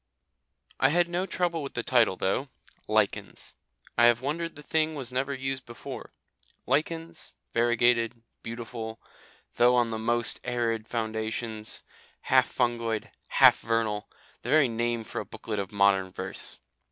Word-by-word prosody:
I - - +5
had 175 +3 +3
no 175 +2 -1
trouble 175 -3 0
with 140 - -7
the 120 - -1
title 120 -6 +3
though 100 +10 -1 0.4
"Lichens." - - 0 0.5
I 120 - +8
have 120 -1 +4
wondered 160 +6 -3
the 150 - -11
thing 155 +1 0
was 130 -4 -4
never 135 +2 0
used 135 -1 -3
before. 120 -1 -8 0.5
Lichens, 165 +1 -2 0.2
variegated, 120 0 +2 0.2
beautiful, 115 -1 -6 0.6
though 125 +1 +6
on 120 -2 +2
the 110 - -3
most 120 +1 +2
arid 115 -2 -1
foundations, 110 -1 -3 0.4
half - - +3
fungoid, 115 -3 -1 0.2
half - - +6
vernal 110 -2 -1 0.3
the - - -6
very 155 -2 +5
name 120 0 -1
for - - -4
a - - -8
booklet 105 -2 -5
of 100 +1 -4
modern 100 -2 +3
verse. - - -5
120 Hz, 140 wpm, -28 LUFS, 110-135 Hz, 0.6 s, I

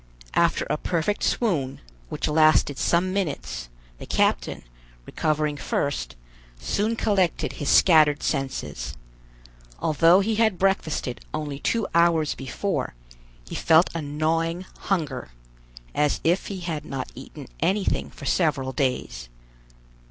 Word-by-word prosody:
After - - +2
a - - 0
perfect 175 +5 -1
swoon, 150 - 0 0.3
which - - -2
lasted 155 -2 +4
some 185 +2 +2
minutes, 70 - -3 0.3
the - - -9
captain, - - 0 0.4
recovering 150 -1 -1
first, 140 - -2 0.4
soon 215 +3 0
collected 195 -6 +1
his 145 - -3
scattered 155 -4 +5
senses. 75 - -3 0.8
Although 165 +5 +4
he 215 +2 0
had 220 -4 +3
breakfasted 165 -9 0
only 145 -2 -4
two 230 +5 0
hours 165 -2 +3
before, 135 - -3 0.5
he - - -8
felt 160 +2 +4
a 165 - -3
gnawing 165 +4 -1
hunger, 150 - -2 0.6
as 150 -1 +1
if 175 +3 +1
he 195 -3 -5
had 165 -4 -3
not 135 -2 -5
eaten - - -10 0.2
anything 195 +1 0
for - - -11
several 145 -7 +1
days. 125 - -2
155 Hz, 120 wpm, -25 LUFS, 140-185 Hz, 0.8 s, scattered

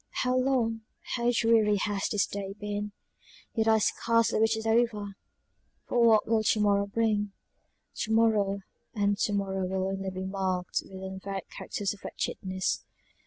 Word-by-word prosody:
How 250 0 +1
long, 250 -4 +1 0.3
how 240 0 +2
dreary 225 -3 +4
has 205 0 -1
this 210 -2 +2
day 195 -1 -5
been; 205 0 -3 0.6
yet 225 -1 +1
I 220 0 +6
scarcely 230 +1 +2
wish 220 0 +3
it 220 - -5
over 220 -3 +1 0.7
for 240 - +2
what 220 -2 +5
will 225 0 +3
to 215 0 +2
morrow 200 -1 +3
bring 210 -1 0 0.6
to 220 - -2
morrow, 210 -3 +3 0.3
and 205 -1 +2
to 205 - +1
morrow 195 -2 -1
will 190 0 -1
only 195 0 -3
be 185 0 -5
marked 190 -2 -1
with 190 0 -10
unvaried 190 0 -5
characters 200 -1 -3
of 205 - -16
wretchedness. 185 0 -2
205 Hz, 155 wpm, -29 LUFS, 195-225 Hz, 0.7 s, I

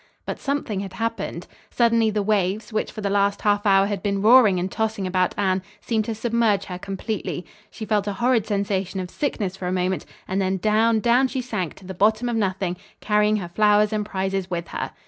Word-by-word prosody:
But - - -4
something 275 -8 -2
had 195 -1 -6
happened. 225 +4 -3 0.2
Suddenly 230 -2 +3
the 210 -1 -1
waves, 210 +1 0
which 215 - -1
for 215 - -7
the 200 - -1
last 200 0 +1
half 205 0 +2
hour 195 0 +5
had 205 0 -3
been 200 -1 -1
roaring 220 -4 +7
and 180 +1 -3
tossing 220 -3 -1
about 185 -1 0
Anne, 190 -2 +1 0.2
seemed 220 0 -1
to 225 - -3
submerge 225 -3 +1
her 180 -1 -6
completely. 195 -1 -4 0.2
She 220 - -7
felt 210 -2 0
a 205 - -1
horrid 235 +1 +1
sensation 195 -2 -1
of 180 -1 -5
sickness 210 -10 -2
for 190 -2 -5
a - - -1
moment; 185 0 -1 0.2
and 190 +1 0
then 190 0 0
down, 220 +3 +2
down 245 +3 +4
she 260 +1 -3
sank 210 -9 -3
to 190 - -15
the 190 - -6
bottom 215 +5 +2
of 235 - -1
nothing, 190 -4 -1 0.2
carrying 210 0 +2
her 190 -5 -3
flowers 210 +2 +3
and 210 -1 0
prizes 190 -2 -2
with 170 -1 -4
her. - - -4
205 Hz, 210 wpm, -23 LUFS, 190-220 Hz, 0.2 s, roaring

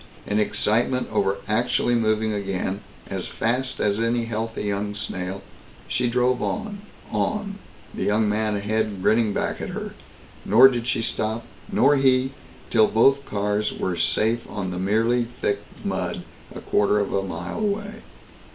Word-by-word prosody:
In 105 +1 0
excitement 120 +4 +1
over 95 +1 +1
actually 120 +2 +1
moving 110 -1 +1
again, 100 -1 -2 0.3
as 95 -2 -4
fast 125 +3 -1
as 105 0 +1
any 115 +1 +1
healthy 115 0 -3
young 105 0 -2
snail, 95 -1 -4 0.4
she 125 -1 0
drove 125 +1 +2
on, 215 -2 -3 0.3
on, 205 -1 -1 0.3
the - - -6
young 105 +1 +2
man 105 0 0
ahead 105 -1 -1
grinning 110 0 +3
back - - -2
at - - -4
her. - - -5 0.5
Nor 120 +6 +8
did 120 -2 -3
she 115 -2 +1
stop, 110 0 -2 0.3
nor 140 +2 +4
he, 130 -1 +3 0.4
till 110 -2 +5
both 135 +5 +4
cars 105 +1 0
were 90 - -2
safe 115 +6 +1
on 95 -3 -4
merely 115 +4 +2
thick 100 - 0 0.3
mud, - - -2 0.3
a - - -7
quarter 105 0 +2
of 100 -1 0
a 100 - +2
mile 95 - -5
away. 205 0 -2
110 Hz, 150 wpm, -24 LUFS, 105-125 Hz, 0.5 s, Nor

